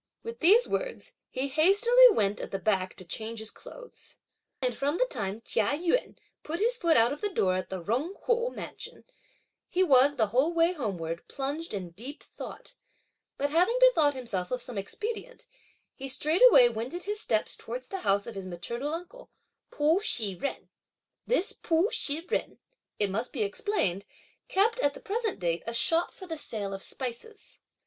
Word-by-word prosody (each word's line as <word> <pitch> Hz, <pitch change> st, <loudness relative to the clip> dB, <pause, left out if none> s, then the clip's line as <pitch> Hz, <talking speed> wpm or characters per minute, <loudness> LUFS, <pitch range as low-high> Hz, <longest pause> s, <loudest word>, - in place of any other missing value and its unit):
With 460 Hz, +1 st, -7 dB
these 415 Hz, +9 st, +6 dB
words, -, -, -4 dB, 0.2 s
he 260 Hz, +2 st, -2 dB
hastily 410 Hz, -, +6 dB
went 205 Hz, -, +1 dB
at -, -, -5 dB
the 195 Hz, -, -3 dB
back 190 Hz, -1 st, 0 dB
to 185 Hz, -, -9 dB
change 220 Hz, +6 st, -4 dB
his 220 Hz, 0 st, -6 dB
clothes. -, -, -13 dB, 0.4 s
And 250 Hz, -3 st, -1 dB
from 285 Hz, +4 st, -1 dB
the -, -, +3 dB
time 220 Hz, -, -4 dB
Chia 225 Hz, +6 st, +1 dB
Yun 345 Hz, +10 st, 0 dB, 0.2 s
put 330 Hz, +3 st, -4 dB
his 470 Hz, +4 st, +2 dB
foot 340 Hz, -8 st, +3 dB
out 230 Hz, +4 st, +4 dB
of 290 Hz, -, -9 dB
the 415 Hz, -, 0 dB
door 185 Hz, -, +1 dB
of 185 Hz, -, -5 dB
the 185 Hz, -2 st, -5 dB
Jung 260 Hz, -, -1 dB
Kuo 475 Hz, +2 st, 0 dB
mansion, -, -, -9 dB, 0.6 s
he 370 Hz, -, +1 dB
was, 280 Hz, -3 st, +5 dB
the 220 Hz, -6 st, +1 dB
whole 295 Hz, +7 st, +2 dB
way 335 Hz, +2 st, +3 dB
homeward, 175 Hz, -, -4 dB
plunged 285 Hz, +5 st, -4 dB
in 185 Hz, -4 st, -5 dB
deep 250 Hz, -, -9 dB
thought; -, -, -9 dB, 0.6 s
but 285 Hz, +1 st, -1 dB
having 360 Hz, +10 st, +3 dB
bethought 320 Hz, -, +5 dB
himself 220 Hz, -8 st, -3 dB
of 250 Hz, -, -2 dB
some 245 Hz, 0 st, -6 dB
expedient, 435 Hz, -, -5 dB, 0.5 s
he 270 Hz, -, -7 dB
straightway 305 Hz, -, +6 dB
wended 240 Hz, +10 st, -5 dB
his 415 Hz, +1 st, -3 dB
steps 220 Hz, -, 0 dB
towards 250 Hz, +3 st, -7 dB
the 385 Hz, -, -4 dB
house 200 Hz, -, +1 dB
of 235 Hz, -, -7 dB
his 195 Hz, -2 st, -7 dB
maternal 235 Hz, -, -4 dB
uncle, 360 Hz, +9 st, -10 dB, 0.4 s
Pu 310 Hz, +5 st, +2 dB
Shih 220 Hz, -, +2 dB
jen. 230 Hz, +10 st, -5 dB, 0.6 s
This 450 Hz, -5 st, +1 dB
Pu 335 Hz, +6 st, +1 dB
Shih 310 Hz, +4 st, 0 dB
jen, -, -, -2 dB, 0.4 s
it 205 Hz, -2 st, 0 dB
must 225 Hz, +5 st, -2 dB
be 240 Hz, -7 st, -1 dB
explained, 200 Hz, -, -1 dB, 0.4 s
kept, 450 Hz, +5 st, +2 dB
at 285 Hz, -, +1 dB
the -, -, -9 dB
present 445 Hz, +1 st, -2 dB
date, 170 Hz, -2 st, -1 dB
a 230 Hz, -, -3 dB
shop 330 Hz, +8 st, +1 dB
for 375 Hz, -, -11 dB
the 325 Hz, -3 st, -6 dB
sale 200 Hz, -7 st, -5 dB
of 195 Hz, -, -6 dB
spices. 260 Hz, -, -7 dB
280 Hz, 180 wpm, -28 LUFS, -, 0.6 s, these